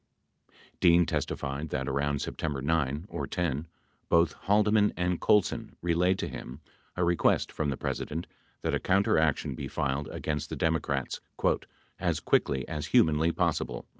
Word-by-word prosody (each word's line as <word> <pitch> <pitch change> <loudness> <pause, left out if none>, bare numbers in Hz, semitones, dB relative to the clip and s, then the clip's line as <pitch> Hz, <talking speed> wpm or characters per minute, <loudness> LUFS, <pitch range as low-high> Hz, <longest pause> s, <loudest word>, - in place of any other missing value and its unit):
Dean 85 -1 +6
testified 70 +1 -3
that, 65 -1 -2
around 70 +1 0
September 75 -4 -3
9 75 +1 0
or - - -4
10, 80 -3 -2 0.4
both 85 -1 +4
Haldeman 105 +1 +3
and 90 -1 0
Colson 105 -3 +2
relayed 90 +2 +2
to - - -2
him 65 +4 -8 0.4
a 90 - 0
request 85 0 +2
from 75 - -1
the 65 - -2
President 80 +3 -3 0.4
that, - - 0
a - - +1
counteraction 80 -8 +2
be - - -5
filed 70 0 -2
against 75 0 -3
the - - -4
Democrats 75 -3 -1 0.8
"as - - 0
quickly 65 -3 +1
as 75 -2 -4
humanly 80 +3 +4
possible." - - -1
80 Hz, 140 wpm, -29 LUFS, 70-85 Hz, 0.8 s, Dean